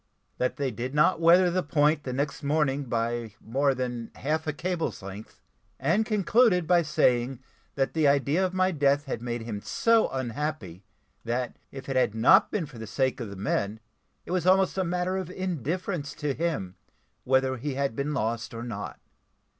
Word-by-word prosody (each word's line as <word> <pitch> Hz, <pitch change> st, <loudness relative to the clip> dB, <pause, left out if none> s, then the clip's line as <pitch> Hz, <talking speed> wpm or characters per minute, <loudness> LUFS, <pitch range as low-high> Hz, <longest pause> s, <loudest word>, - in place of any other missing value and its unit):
That 125 Hz, -, 0 dB
they 140 Hz, -2 st, -1 dB
did 125 Hz, +5 st, -5 dB
not 160 Hz, +4 st, +4 dB
weather 175 Hz, +2 st, +6 dB
the 185 Hz, +1 st, +1 dB
point 150 Hz, 0 st, +2 dB
the 130 Hz, -, -3 dB
next 140 Hz, +2 st, -2 dB
morning 145 Hz, -1 st, +1 dB
by 115 Hz, -2 st, -2 dB
more 135 Hz, +4 st, +1 dB
than 125 Hz, -2 st, -4 dB
half 155 Hz, +3 st, -2 dB
a -, -, +1 dB
cable's 165 Hz, -, -3 dB
length; 100 Hz, +2 st, -10 dB, 0.4 s
and 190 Hz, +11 st, +1 dB
concluded 210 Hz, -3 st, +3 dB
by 175 Hz, +1 st, +4 dB
saying, 125 Hz, -4 st, +1 dB, 0.4 s
that 135 Hz, -1 st, 0 dB
the 155 Hz, -2 st, +3 dB
idea 140 Hz, +5 st, +2 dB
of 185 Hz, -, 0 dB
my 185 Hz, 0 st, +2 dB
death 145 Hz, -2 st, +2 dB
had 130 Hz, -, -4 dB
made 120 Hz, -1 st, -3 dB
him 110 Hz, -3 st, -5 dB
so 230 Hz, -, +2 dB
unhappy, 125 Hz, -, -4 dB, 0.4 s
that 120 Hz, +1 st, -2 dB, 0.2 s
if 135 Hz, -1 st, -9 dB
it 135 Hz, -, -3 dB
had 120 Hz, -4 st, +2 dB
not 190 Hz, -, +6 dB
been 200 Hz, -6 st, -2 dB
for 135 Hz, -5 st, -12 dB
the 110 Hz, -, -7 dB
sake 130 Hz, +4 st, 0 dB
of 115 Hz, -4 st, -5 dB
the 100 Hz, -, -8 dB
men, 100 Hz, +2 st, -1 dB, 0.5 s
it -, -, -7 dB
was 180 Hz, -1 st, 0 dB
almost 190 Hz, 0 st, +4 dB
a 190 Hz, -, +1 dB
matter 180 Hz, +2 st, -1 dB
of 185 Hz, -3 st, -4 dB
indifference 180 Hz, -, -3 dB
to 150 Hz, -2 st, -2 dB
him 140 Hz, -, -3 dB, 0.5 s
whether 130 Hz, 0 st, +2 dB
he 135 Hz, +3 st, -4 dB
had 140 Hz, -3 st, -1 dB
been 140 Hz, +4 st, -2 dB
lost 115 Hz, -4 st, -2 dB
or 115 Hz, -, -5 dB
not. 120 Hz, -, -6 dB
140 Hz, 185 wpm, -27 LUFS, 120-170 Hz, 0.5 s, weather